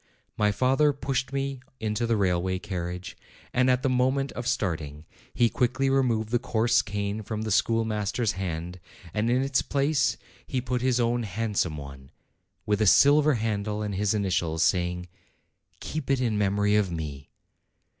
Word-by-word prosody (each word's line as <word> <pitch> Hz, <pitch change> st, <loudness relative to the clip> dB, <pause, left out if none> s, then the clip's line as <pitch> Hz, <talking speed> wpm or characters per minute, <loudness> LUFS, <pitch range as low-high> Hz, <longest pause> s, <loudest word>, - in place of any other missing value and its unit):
My 105 Hz, -1 st, +2 dB
father 135 Hz, +6 st, +3 dB
pushed 135 Hz, -2 st, -2 dB
me 135 Hz, -1 st, -2 dB, 0.2 s
into 110 Hz, +2 st, -1 dB
the 115 Hz, -1 st, +2 dB
railway 95 Hz, -1 st, +1 dB
carriage, 90 Hz, -2 st, -5 dB, 0.4 s
and 125 Hz, +1 st, +3 dB
at 125 Hz, 0 st, +2 dB
the -, -, +2 dB
moment 130 Hz, +2 st, +1 dB
of 120 Hz, -, -5 dB
starting 80 Hz, -, -2 dB, 0.3 s
he 120 Hz, -, +3 dB
quickly 130 Hz, +3 st, 0 dB
re 135 Hz, 0 st, +4 dB
moved 110 Hz, -4 st, 0 dB
the 120 Hz, +1 st, +1 dB
coarse 120 Hz, -1 st, +2 dB
cane 100 Hz, +1 st, -3 dB
from 110 Hz, +1 st, -4 dB
the 110 Hz, -, -3 dB
schoolmaster's 110 Hz, +1 st, +1 dB
hand, 90 Hz, -1 st, -5 dB, 0.3 s
and 110 Hz, +2 st, 0 dB
in 125 Hz, +2 st, +2 dB
its 135 Hz, -2 st, +1 dB
place 140 Hz, +2 st, +1 dB, 0.3 s
he 130 Hz, -, -1 dB
put 125 Hz, 0 st, -2 dB
his 125 Hz, -1 st, +2 dB
own 120 Hz, 0 st, +1 dB
handsome 100 Hz, -6 st, -1 dB
one, 70 Hz, -2 st, -10 dB, 0.6 s
with 105 Hz, 0 st, +1 dB
a 105 Hz, -, +3 dB
silver 145 Hz, +6 st, +6 dB
handle 105 Hz, -1 st, -2 dB
and 105 Hz, -1 st, -3 dB
his 100 Hz, +2 st, 0 dB
initials, 90 Hz, -5 st, 0 dB
saying, 90 Hz, -1 st, 0 dB, 0.7 s
"Keep 155 Hz, -3 st, -5 dB
it 135 Hz, -1 st, +2 dB
in 120 Hz, -4 st, 0 dB
memory 105 Hz, 0 st, +2 dB
of 105 Hz, -4 st, +2 dB
me." 75 Hz, -4 st, -6 dB
110 Hz, 165 wpm, -26 LUFS, 95-125 Hz, 0.7 s, silver